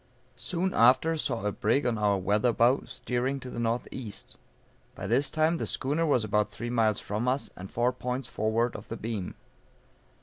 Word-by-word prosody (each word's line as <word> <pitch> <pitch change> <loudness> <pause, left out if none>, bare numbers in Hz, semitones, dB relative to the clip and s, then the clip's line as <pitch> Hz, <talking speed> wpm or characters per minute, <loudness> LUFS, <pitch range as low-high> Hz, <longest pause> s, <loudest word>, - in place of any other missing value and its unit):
Soon 180 +5 -1
after 130 +7 +5
saw 115 -8 -1
a 105 - +1
brig 115 +8 +1
on 115 -3 0
our 100 -1 +3
weather 105 +5 +2
bow 120 +4 +3
steering 125 +2 -2
to 130 -1 -8
the - - -5
N.E. 115 0 -2 0.8
By - - -6
this 140 +1 +2
time 160 +2 +2
the - - -3
schooner 150 +5 0
was 130 -6 +3
about 105 0 +1
three 120 +4 -5
miles 110 -3 +2
from 105 +4 -3
us 130 +2 0
and 95 +1 -8
four 120 +2 +1
points 125 0 -3
forward 115 +3 0
of - - -9
the 115 - -4
beam. 110 -5 -4
120 Hz, 180 wpm, -28 LUFS, 110-130 Hz, 0.8 s, after